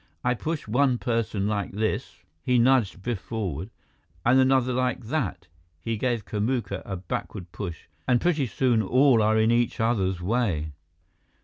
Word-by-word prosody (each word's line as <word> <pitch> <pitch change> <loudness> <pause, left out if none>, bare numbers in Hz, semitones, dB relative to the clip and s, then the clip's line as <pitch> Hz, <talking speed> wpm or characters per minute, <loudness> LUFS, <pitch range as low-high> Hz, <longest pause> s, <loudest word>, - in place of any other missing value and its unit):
"I 125 - +2
push 155 +3 -4
one 125 +3 +2
person 115 -4 -1
like 100 -3 -2
this" 110 +2 -2 0.2
he 125 +7 +2
nudged 120 -6 +3
Biff 120 -3 -2
forward 95 -4 -4 0.6
"and 125 +3 +5
another 130 -1 +3
like 125 0 0
that" 130 - -2 0.3
he 115 +8 -2
gave 120 -2 -1
Kamuka 110 -2 -2
a 95 - -4
backward 90 0 -5
push 85 -6 -6 0.2
"and 125 -2 +4
pretty 155 -5 +1
soon 120 +1 +2
all 125 +3 +4
are 110 +1 +3
in 110 +1 +3
each 120 0 +1
other's 100 -5 +1
way." 90 -6 0
115 Hz, 150 wpm, -26 LUFS, 100-125 Hz, 0.6 s, and